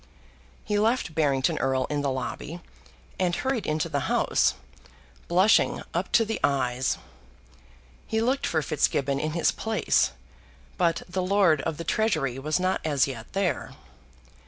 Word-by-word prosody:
He 210 -1 0
left 225 -5 +1
Barrington 140 -4 +1
Erle 130 -1 +1
in 145 -1 0
the 140 - 0
lobby, 130 +5 -4 0.6
and 180 -2 +1
hurried 260 0 -2
into 155 0 0
the - - -1
House, - - +2 0.7
blushing 185 +5 +3
up - - -2
to 225 - +5
the 225 +1 -3
eyes. 130 -2 +1 1.1
He 220 - 0
looked 255 +4 +1
for 160 -2 0
Fitzgibbon 140 -2 0
in 155 +1 -2
his 170 -1 +2
place, 220 0 +1 0.7
but 170 -2 +1
the 185 +1 -2
Lord 185 -5 +3
of 160 +1 -3
the 165 - -5
Treasury 155 - 0
was 155 +5 0
not 185 +1 0
as 145 -4 +2
yet 120 -5 -7
there. 195 -2 -1
160 Hz, 145 wpm, -26 LUFS, 140-200 Hz, 1.1 s, to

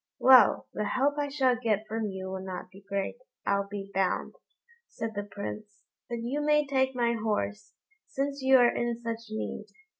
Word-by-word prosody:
"Well! 260 -1 +6
the 210 - -2
help 280 +6 +1
I 290 - 0
shall 265 -3 +2
get 220 -3 0
from 220 0 -2
you 190 -1 -5
will 190 0 -5
not 185 -1 -6
be 195 - -14
great, 200 - -2 0.3
I'll 200 0 +1
be 200 -1 -7
bound," 190 -1 0 0.5
said 225 -1 -5
the 205 - -2
Prince; 205 +1 -7 0.3
"but 235 -1 -4
you 270 +5 -1
may 300 0 +3
take 265 -1 +1
my 235 -1 +2
horse, 105 - -2 0.3
since 280 +1 -3
you 265 0 +6
are 245 -1 +4
in 240 -1 -1
such 230 -1 -5
need." 215 0 -4
230 Hz, 180 wpm, -29 LUFS, 200-260 Hz, 0.5 s, Well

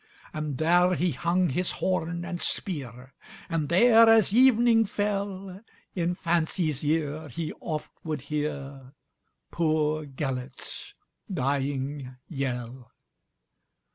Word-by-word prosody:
And 150 -3 -3
there 175 +4 +4
he 175 0 +1
hung 170 +6 +1
his 180 +7 0
horn 175 -1 -1
and 175 -1 -4
spear, 130 - -4 0.4
And 160 -4 -1
there, 225 +5 +7
as 220 -3 +5
evening 240 -2 +5
fell, 195 -2 -3 0.3
In 175 -1 -1
fancy's 165 -4 0
ear 155 0 -1
he 155 +5 -4
oft 155 -2 -4
would 155 -4 -3
hearPoor 140 -3 -4 0.6
Gêlert's 150 -5 -2 0.4
dying 135 -3 -2
yell. 125 -4 -4
155 Hz, 100 wpm, -27 LUFS, 140-180 Hz, 0.6 s, there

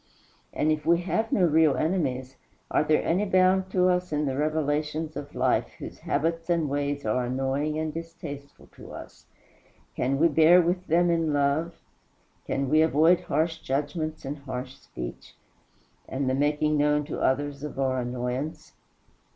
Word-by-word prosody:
And 155 - +1
if 155 -1 -1
we 170 +1 +3
have 220 +5 -1
no 190 - +2
real 155 -3 +4
enemies, 135 -6 -1 0.4
are - - +3
there 155 0 +2
any 180 +5 +1
bound 185 -1 +3
to 185 -1 +2
us 180 -1 0
in 150 0 0
the 135 -2 -1
relations 155 +1 -1
of 145 0 -7
life - - +1
whose - - -9
habits 165 +3 -1
and 170 -3 +1
ways 145 -1 -2
are 125 +4 +1
annoying 135 +4 -1
and 155 -1 -2
distasteful 165 -4 -8
to - - -11
us? - - -11 0.7
Can 135 +2 0
we 165 +4 +5
bear 160 +3 +6
with 180 +1 0
them 175 +2 +3
in 165 -2 +1
love? 145 +4 +1 0.7
Can 135 0 -1
we 155 +4 +4
avoid 160 +3 +4
harsh 160 +3 -1
judgments, 150 +3 -3
and 145 +2 -5
harsh 130 -1 -6
speech, - - -9 0.7
and 135 0 -2
the 130 - +1
making 150 +2 +1
known 150 0 +2
to 145 - -5
others 140 +1 0
our 135 -3 -1
annoyance? 125 +4 -4
150 Hz, 160 wpm, -26 LUFS, 140-165 Hz, 0.7 s, bear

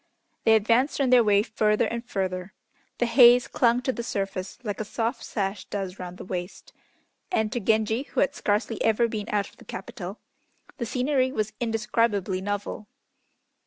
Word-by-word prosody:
They 225 - +6
advanced 235 +6 +2
on 265 -2 +2
their 250 -2 +7
way 205 -1 +4
further 215 -1 +1
and 235 0 -3
further. 190 -4 -3 0.4
The 240 - +1
haze 240 +1 +7
clung 240 0 +2
to 260 - +1
the 240 - -4
surface 195 -4 -4
like 205 -3 -4
a - - -1
soft 230 +3 -3
sash 195 -1 -3
does 195 -2 -5
round 180 0 -7
the - - -9
waist, 180 0 -6 0.6
and 220 - +1
to 240 - -1
Genji, 220 +2 +1
who - - 0
had 275 - +2
scarcely 210 +2 -1
ever 225 +1 +3
been 215 -2 -5
out 205 -2 0
of - - -24
the - - -15
capital, - - -7 0.6
the 235 - -2
scenery 260 +2 +1
was 215 -3 -2
indescribably 215 -4 0
novel. 205 +1 -4
220 Hz, 170 wpm, -26 LUFS, 200-235 Hz, 0.6 s, their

